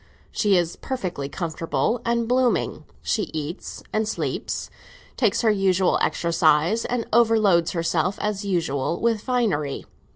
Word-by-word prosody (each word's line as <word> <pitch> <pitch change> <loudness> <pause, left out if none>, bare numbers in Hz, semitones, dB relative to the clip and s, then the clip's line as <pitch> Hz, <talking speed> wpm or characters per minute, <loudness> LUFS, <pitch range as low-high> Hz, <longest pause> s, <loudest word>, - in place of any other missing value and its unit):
She 205 -4 +2
is 170 -1 -1
perfectly 185 - -4
comfortable 170 - -2
and 235 -1 0
blooming; 250 0 +1 0.2
she 215 - -1
eats 155 +4 -5
and 215 0 0
sleeps, - - -3 0.4
takes 230 -3 +2
her 225 - +4
usual 190 -2 +2
exercise, 170 +4 +2
and 240 -2 -1
overloads 215 -7 +4
herself, 170 +2 0
as 210 -1 -2
usual, 165 -5 -1
with 230 -2 +1
finery. 205 - -1
195 Hz, 125 wpm, -24 LUFS, 165-230 Hz, 0.4 s, her